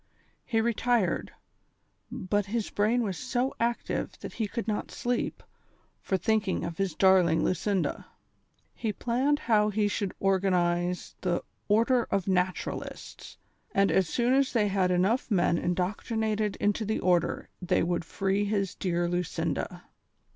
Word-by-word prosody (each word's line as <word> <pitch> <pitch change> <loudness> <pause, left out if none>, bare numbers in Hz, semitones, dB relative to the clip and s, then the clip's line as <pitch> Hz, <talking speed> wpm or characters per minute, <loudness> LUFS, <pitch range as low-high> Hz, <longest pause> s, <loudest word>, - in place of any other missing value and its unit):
He 225 -3 +1
retired, 230 -4 +1 0.8
but 205 -4 -1
his 220 +1 -2
brain 225 +4 +2
was 195 -5 -3
so 255 +1 -1
active 235 0 -1
that - - -7
he 220 - -2
could 230 +2 -4
not 210 -1 -2
sleep 245 0 -2 0.6
for 190 - 0
thinking 210 +1 0
of 170 0 -6
his 190 -5 -1
darling 180 -3 +4
Lucinda. 185 +1 -1 0.7
He 220 - -2
planned 255 +7 +1
how 215 -6 +2
he 210 0 +1
should 205 -2 -2
organize 180 -2 +1
the 175 -2 0
" - - -45
Order 240 +1 +3
of 195 -2 -1
Xatu 185 -1 +1
ralists," - - -9 0.4
and 195 0 +4
as 185 -4 +2
soon 245 +1 +2
as 275 0 +2
they 210 -4 +2
had 190 -2 +2
enough 190 +9 +1
men 175 -4 +2
indoctrinated 210 +4 -1
into 205 +2 0
the 215 +1 -1
order 175 -2 +1
they 180 - +1
would 175 0 0
free 195 +4 0
his 200 -2 -1
dear 175 -2 -1
Lucinda. 175 -1 -2
200 Hz, 145 wpm, -28 LUFS, 180-225 Hz, 0.8 s, darling